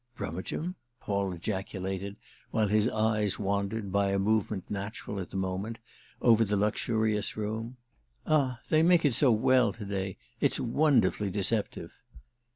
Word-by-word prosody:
"Brummagem?" 120 - -4 0.3
Paul 100 -1 -1
ejaculated 95 +1 -4 0.3
while 110 -2 +1
his 105 +3 +3
eyes 110 -3 +1
wandered, 100 +1 -2
by 100 0 +2
a 100 - +1
movement 105 -1 0
natural 100 0 -5
at 90 - -5
the - - -5
moment, 95 +4 -3 0.5
over 115 -2 +6
the 105 -1 0
luxurious 110 +1 0
room. 110 +3 -4 0.5
"Ah 135 -6 +1
they 155 - +4
make 170 -1 +4
it 140 - +3
so 130 +2 +4
well 120 +2 +4
to 110 - -8
day—it's 95 -1 -3
wonderfully 115 -7 +2
deceptive!" 100 +2 0
105 Hz, 135 wpm, -29 LUFS, 100-115 Hz, 0.5 s, over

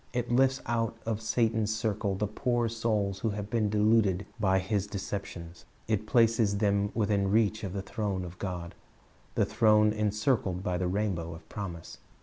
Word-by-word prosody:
It 120 -1 -2
lifts 130 +2 +3
out 115 -1 -1
of 110 -1 -2
Satan's 110 -1 +1
circle 105 -2 -1
the 105 - -1
poor 120 +3 0
souls 110 -4 -1
who 110 - 0
have 105 +1 -5
been 110 -3 +1
deluded 105 -2 +3
by 95 -2 +3
his 100 +1 -1
deceptions. 90 -4 -6 0.2
It 110 -1 0
places 115 -4 +3
them 100 -1 +2
within 100 -3 +1
reach 110 +1 +2
of 95 -3 -4
the 100 -1 -3
throne 100 -4 -3
of 90 0 -10
God, 90 -3 -4 0.6
the - - +3
throne 105 -1 +4
encircled 105 -3 0
by 90 -2 -1
the 90 - 0
rainbow 90 -4 -2
of 80 0 -14
promise. 90 -5 -7
105 Hz, 165 wpm, -29 LUFS, 95-110 Hz, 0.6 s, throne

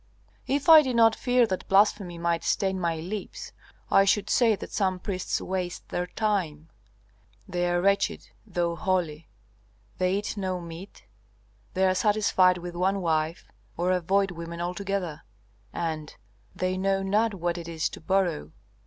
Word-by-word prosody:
"If 280 +3 -1
I 320 -2 +10
did 260 -4 -2
not 225 -1 +5
fear 250 -1 +3
that 190 -4 -4
blasphemy 195 -3 +2
might 170 0 -1
stain 190 -1 0
my 170 -2 0
lips, 185 +6 -6 0.4
I 195 - +6
should 200 +1 +1
say 230 -3 +4
that - - -9
some 190 -3 0
priests 185 0 -3
waste 180 -1 -4
their 180 0 -2
time. 175 -7 -2 0.8
They 175 0 -1
are 175 0 +1
wretched, 200 +2 0
though 175 -5 -2
holy! 170 -4 -2 0.7
They 185 +1 +2
eat 205 +2 -3
no 185 -2 -2
meat, 170 +3 -10 0.7
they 190 +1 +3
are 185 - +3
satisfied 190 -2 +3
with 175 0 -7
one 190 +3 +1
wife, 160 -1 -1 0.3
or 180 +2 +1
avoid 190 +2 +1
women 170 0 -7
altogether, 180 -2 -3 0.5
and 160 -3 -4 0.4
they 185 0 -1
know 195 0 +1
not 210 +2 +1
what 175 -1 -2
it 170 - -8
is 165 -2 -1
to - - -10
borrow. 175 - 0
185 Hz, 155 wpm, -27 LUFS, 170-200 Hz, 0.8 s, I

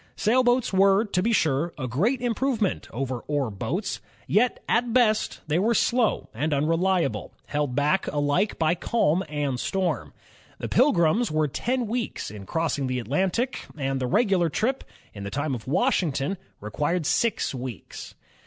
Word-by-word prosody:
Sailboats 245 +1 +2
were, 195 +3 +4
to 195 -3 0
be 230 +5 +1
sure) 160 -4 +1
a 130 -3 -3
great 205 - 0
improvement 240 -4 0
over 130 0 -3
oar 145 -6 0
boats. 145 - -3 0.2
Yet 240 +4 +2
at 235 0 +1
best 220 -4 +2
they 155 +2 +1
were 230 +5 +2
slow 235 - +2
and 145 +6 0
unreliable, 165 +2 0
held 145 -4 -2
back 150 +7 +1
alike 145 +8 0
by 160 0 +2
calm 180 -2 +1
and 145 -4 -2
storm. 190 +5 -1 0.5
The - - -4
Pilgrims 220 - +3
were 155 0 +1
ten 245 - -1
wedcs 230 - -3
in 100 -2 -10
cross 160 -2 -1
ing 135 - -1
the 130 0 -1
Atlantic, 185 - -1
and 135 -2 -1
the 125 - 0
regular 190 - +2
trip, 245 - -1 0.3
in 100 - -8
the 100 - -4
time 145 +5 -2
of 120 -2 -6
Washington, 165 - +1 0.3
required 150 - -1
six 230 +2 +1
weeks. 125 -8 -7
170 Hz, 155 wpm, -25 LUFS, 140-220 Hz, 0.5 s, were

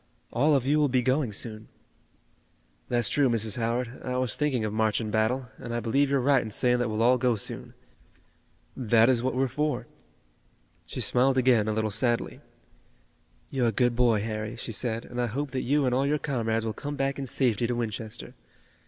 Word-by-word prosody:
All 145 +5 +3
of 130 -3 +1
you 150 +3 +3
will 150 - +4
be 125 -1 +1
going 130 -1 +1
soon." 110 +1 -5 1.2
"That's 120 -3 +3
true, 140 +2 +3
Mrs. 110 -3 +1
Howard, 120 +2 -2
I 125 0 -2
was 125 -3 0
thinking 135 -7 0
of 105 - -3
march 110 -1 +1
and 110 -2 -4
battle, 120 +4 0
and 120 -1 -5
I - - 0
believe 135 +5 +1
you're 140 -1 +2
right 135 +1 +3
in 110 - -6
saying 125 +3 +2
that 120 -1 0
we'll 110 +1 0
all 125 +1 +4
go 125 -1 +2
soon. 100 - -7 1.0
That 115 -1 +4
is 125 -3 +3
what 130 +1 -1
we're 135 +1 +2
for." 150 +4 -2 1.0
She - - -5
smiled 130 +2 +2
again 125 -4 +3
a - - +1
little 110 0 -1
sadly. 120 +2 -1 1.1
"You're 125 -3 +1
a - - +2
good 120 +2 +1
boy, 115 -4 +3
Harry," 110 +1 -4
she 115 - -5
said, 115 +1 -3
"and 125 0 -4
I 120 - 0
hope 140 +5 -3
that 130 -1 -2
you 145 +2 +1
and 125 - +1
all 135 +2 +1
your 150 +1 +2
comrades 115 -6 -1
will 110 - -2
come 145 +4 -5
back 135 0 -1
in 135 - -4
safety 120 -2 +1
to 120 - -1
Winchester. 110 -2 -5
120 Hz, 205 wpm, -27 LUFS, 115-130 Hz, 1.2 s, will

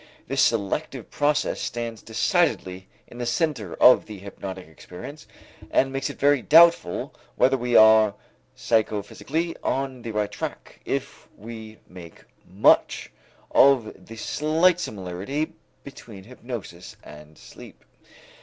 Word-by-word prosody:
This 135 +2 0
selective 115 +4 -1
process 150 0 0
stands 115 -2 -5
decidedly 110 - -1 0.2
in 120 - -13
the 120 - -3
center 120 - -2
of 125 - +5
the 105 -2 -9
hypnotic 95 -2 -9
experience 90 - -11 0.4
and 135 0 +1
makes 135 0 -2
it - - -9
very 145 -1 +3
doubtful 165 - +4 0.2
whether 135 +1 +3
we 125 -2 -2
are 110 -1 +6 0.4
psychophysically 120 - -2
on 135 -2 -2
the 115 - -7
right 105 -1 -2
track, - - -7
if - - -5
we 110 0 -10
make 90 -3 -13 0.3
much - - +2 0.4
of 130 -5 +3
the 115 - -10
slight 160 +9 +1
similarity 100 - -4 0.3
between 115 -7 -12
hypnosis 115 -6 -9
and 75 +1 -14
sleep. - - -15
115 Hz, 120 wpm, -24 LUFS, 100-140 Hz, 0.4 s, are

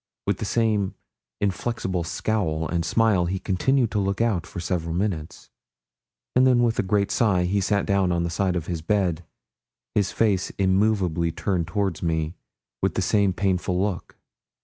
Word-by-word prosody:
With 100 -1 0
the - - -2
same 105 -2 +1 0.4
inflexible 100 -2 -1
scowl 80 -3 -1
and 85 +2 -1
smile, 100 -3 +2
he 95 +2 -1
continued 110 +6 +1
to 105 - 0
look 100 -1 -1
out 105 -7 +1
for - - -7
several 85 -2 -2
minutes, 90 -5 -3 0.8
and 130 +1 +5
then 125 -2 +4
with 115 -1 +1
a - - +6
great 100 +1 0
sigh, 95 -6 +2
he 100 +3 +1
sat 100 +1 +1
down 100 -2 +2
on 85 -1 +1
the 85 - -2
side 90 +2 0
of 85 -3 -2
his 85 -3 -3
bed, 90 -2 0 0.7
his 100 -2 +1
face 100 -5 +1
immovably 95 -4 +2
turned 90 -2 -1
towards 100 -3 -1
me, 80 -1 -1 0.5
with - - 0
the 95 - +1
same 100 0 +3
painful 90 -1 0
look. 95 -3 -3
95 Hz, 170 wpm, -24 LUFS, 85-105 Hz, 0.8 s, a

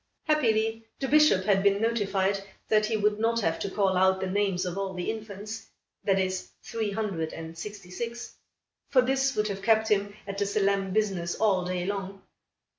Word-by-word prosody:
Happily 225 -7 +1
the 270 - -2
Bishop 300 -10 +5
had 195 -2 +3
been 200 0 +3
notified 200 -3 +1 0.3
that 215 0 +4
he 220 -1 0
would 210 0 +1
not 230 +1 +2
have 165 -4 0
to 200 - -2
call 195 -1 +1
out 190 +1 +4
the 190 - -2
names 190 -1 0
of 180 -1 -3
all 195 -1 -3
the 180 - -1
infants, 215 0 -7 0.4
that 195 -1 +2
is, 185 -1 -1
three 220 -2 -2
hundred 195 -6 -2
and 165 0 -7
sixty 195 0 -8
six; 235 +5 -5 0.6
for 255 -2 +5
this 270 +1 +1
would 210 0 +1
have 195 -2 -4
kept 220 +1 +3
him 205 0 +1
at 200 0 -5
the 200 - +1
solemn 200 -1 +1
business 190 -4 0
all 195 -4 +2
day 180 -1 -2
long. 195 0 -4
200 Hz, 190 wpm, -28 LUFS, 190-220 Hz, 0.6 s, Bishop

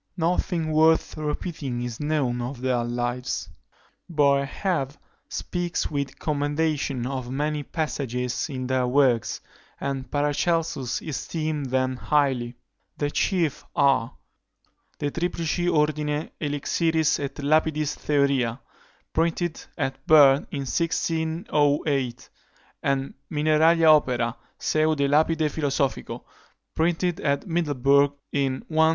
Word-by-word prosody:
Nothing 165 -1 0
worth 160 +1 +3
repeating 150 -4 -3
is 120 -2 -5
known 145 -5 0
of 125 +1 -5
their 125 -2 +1
lives. 120 +1 -2 0.6
Boerhaave 140 0 +1 0.3
speaks 175 -2 -2
with 140 -2 -3
commendation 145 -3 -1
of 130 -2 -4
many 150 +3 -1
passages 135 -4 -2
in 130 -2 -4
their 130 -1 +1
works, 125 -3 +2 0.4
and 135 -1 -3
Paracelsus 145 -1 0
esteemed 155 -1 -3
them 130 0 0
highly: 130 -5 +1 0.4
the 145 -1 -1
chief 170 -6 0
are, 140 -5 +2 0.8
De 145 - -2
Triplici 170 +1 -1
Ordine 150 -1 0
Elixiris 155 +2 +1
et 140 -1 -4
Lapidis 155 +1 +1
Theoria, 140 -5 +1 0.5
printed 165 0 0
at 135 -2 -3
Berne 145 -3 +6
in 140 - -4
1608; 150 - 0 0.5
and 135 0 -1 0.2
Mineralia 155 +2 +3
Opera, 120 -4 -1 0.2
seu 155 0 +1
de 140 -1 +1
Lapide 155 +2 +3
Philosophico, 140 -3 -1 0.5
printed 170 +1 0
at 140 -1 0
Middleburg 145 -5 +2 0.2
in 135 -2 -1
1600. 160 0 +4
145 Hz, 105 wpm, -25 LUFS, 135-160 Hz, 0.8 s, Berne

